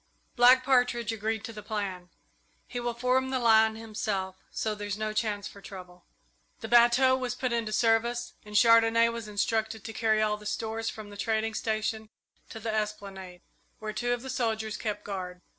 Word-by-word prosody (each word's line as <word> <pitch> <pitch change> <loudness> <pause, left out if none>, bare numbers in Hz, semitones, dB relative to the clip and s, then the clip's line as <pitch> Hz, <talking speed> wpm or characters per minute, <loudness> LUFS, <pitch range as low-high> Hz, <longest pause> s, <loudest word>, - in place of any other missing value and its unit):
Black 255 +1 +7
Partridge 245 -3 +2
agreed 220 0 -2
to 230 - -7
the 210 - -8
plan. 200 -4 -4 0.6
He 245 - -5
will 240 -1 -2
form 255 +2 +1
the 260 - 0
line 220 -2 +4
himself, 210 -4 -3
so 220 - -2
there's 205 -1 -4
no 215 0 -2
chance 210 -2 -1
for 200 - -12
trouble." 180 -2 -11 0.6
The 225 - -5
bateau 240 +3 +5
was 255 -2 -3
put 255 -2 -2
into 230 -2 -1
service, 230 +2 +1
and 210 0 -2
Chandonnais 230 +1 +6
was 230 -2 -6
instructed 220 +1 -1
to 225 - -7
carry 220 -2 +2
all 210 -1 +1
the 210 0 -9
stores 225 +1 -2
from 215 -2 -9
the 205 - -10
trading 220 +1 -1
station 220 0 -2 0.4
to 225 - -8
the 220 0 -3
esplanade, 200 -4 -4 0.4
where 215 0 -5
two 245 +2 -1
of 245 0 -1
the 265 - -5
soldiers 220 -4 -1
kept 210 -1 -4
guard. 180 -3 -6
220 Hz, 180 wpm, -28 LUFS, 210-235 Hz, 0.6 s, Black